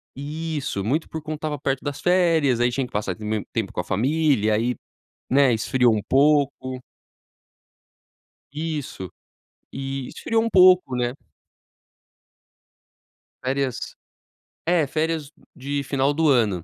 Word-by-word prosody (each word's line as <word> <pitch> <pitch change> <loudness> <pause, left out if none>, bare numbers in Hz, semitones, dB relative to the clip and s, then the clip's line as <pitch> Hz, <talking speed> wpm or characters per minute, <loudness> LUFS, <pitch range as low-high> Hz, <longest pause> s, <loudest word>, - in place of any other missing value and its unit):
Isso. 150 -6 -4
Muito 145 - 0
por 160 - -5
conta 155 +1 -5
estava 150 -1 -4
perto 135 -1 -2
das 145 -2 -4
férias, 165 -8 +3
aí 120 0 +2
tinha 135 +2 -1
que - - -13
passar 100 -3 -2
u - - -9
m 105 0 -2
tempo 110 -4 -2
com - - -5
a - - 0
família, 125 - +1
aí, 120 +3 0 0.5
né, 135 -1 +4
esfriou 120 +1 +2
um 105 - -1
pouco. 140 -2 +2 1.7
Isso 150 - -4 0.6
e 135 -1 -4
esfriou 225 -1 -1
um 230 - -1
pouco, 185 - +5
né? 125 0 -1 2.3
Férias 130 -1 -2 0.7
é, 165 -2 +3
férias 155 0 -2 0.2
de 140 +2 -3
final 140 +1 +1
do 160 0 +2
ano, 105 - +2
135 Hz, 130 wpm, -23 LUFS, 120-155 Hz, 2.3 s, pouco